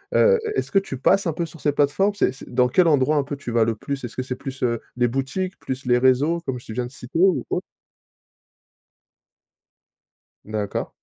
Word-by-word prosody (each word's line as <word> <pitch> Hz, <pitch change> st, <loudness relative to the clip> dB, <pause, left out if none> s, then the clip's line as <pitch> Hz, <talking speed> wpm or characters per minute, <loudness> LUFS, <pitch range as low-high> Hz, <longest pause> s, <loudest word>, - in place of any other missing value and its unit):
Heu, 480 Hz, -1 st, +5 dB, 0.2 s
est-ce -, -, -2 dB
que 195 Hz, -, +5 dB
tu 135 Hz, -9 st, -6 dB
passes 195 Hz, +7 st, +3 dB
un 160 Hz, -, 0 dB
peu 170 Hz, +1 st, -2 dB
sur 160 Hz, 0 st, -12 dB
ces 145 Hz, -, +2 dB
plateformes? 145 Hz, +9 st, +2 dB
C'est 195 Hz, -, +2 dB
c'est -, -, -12 dB
dans 125 Hz, 0 st, +4 dB
quel 175 Hz, +5 st, +4 dB
endroit 150 Hz, 0 st, +3 dB
un 140 Hz, -, +2 dB
peu, 145 Hz, +1 st, -5 dB
tu 135 Hz, -4 st, -7 dB
vas 115 Hz, -1 st, +3 dB
le 115 Hz, -, 0 dB
plus? 135 Hz, +4 st, -5 dB
Est-ce 120 Hz, -, -6 dB
que 130 Hz, -, -2 dB
c'est 125 Hz, 0 st, -4 dB
plus, 135 Hz, 0 st, -8 dB
heu, 115 Hz, -2 st, 0 dB, 0.2 s
les 120 Hz, 0 st, +3 dB
boutiques, 135 Hz, +10 st, -3 dB
plus 130 Hz, 0 st, -5 dB
les 125 Hz, 0 st, +4 dB
réseaux, 130 Hz, +7 st, +3 dB
comme 130 Hz, -6 st, -4 dB
je 115 Hz, -, -11 dB
viens 125 Hz, +1 st, -2 dB
de 125 Hz, -, -9 dB
citer 130 Hz, +5 st, -6 dB
ou 185 Hz, -1 st, +4 dB
autre? -, -, 0 dB, 2.8 s
D'accord. 105 Hz, -1 st, -3 dB
135 Hz, 210 wpm, -23 LUFS, 125-165 Hz, 2.8 s, Heu